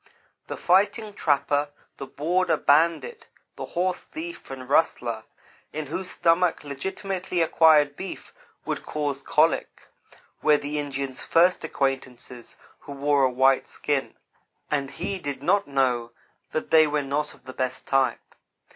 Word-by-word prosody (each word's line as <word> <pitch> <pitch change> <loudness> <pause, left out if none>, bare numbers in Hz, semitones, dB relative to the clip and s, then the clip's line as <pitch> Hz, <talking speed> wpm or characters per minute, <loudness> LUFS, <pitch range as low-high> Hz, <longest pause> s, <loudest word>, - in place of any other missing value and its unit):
The - - -5
fighting 205 +4 +2
trapper, 145 -3 +1 0.3
the 140 - -7
border 165 +4 +1
bandit, 170 - +2 0.3
the - - -5
horse 180 +1 -1
thief 340 +2 -8
and 130 -1 -8
rustler, 120 -6 +1 0.5
in 155 0 -4
whose 180 +6 -4
stomach 165 +1 +2
legitimately 185 +5 -3
acquired 155 -3 +5
beef 190 - -8 0.3
would - - -2
cause 145 -2 -3
colic - - +1 0.5
were 150 -1 +5
the 145 +1 -3
Indians' 140 -2 -4
first 175 +2 +3
acquaintances 130 -5 -3 0.2
who 140 - -9
wore 140 0 +2
a 130 - +4
white 130 +1 +3
skin, 145 -2 -2 0.6
and 140 -2 0
he 195 +6 -4
did 140 -4 -5
not 200 +5 +2
know 125 -4 0 0.4
that 155 - -3
they 155 -1 +7
were 150 -1 0
not 145 +2 -2
of - - -26
the 130 - -8
best 130 0 -3
type. 135 -1 0
145 Hz, 140 wpm, -25 LUFS, 135-170 Hz, 0.6 s, they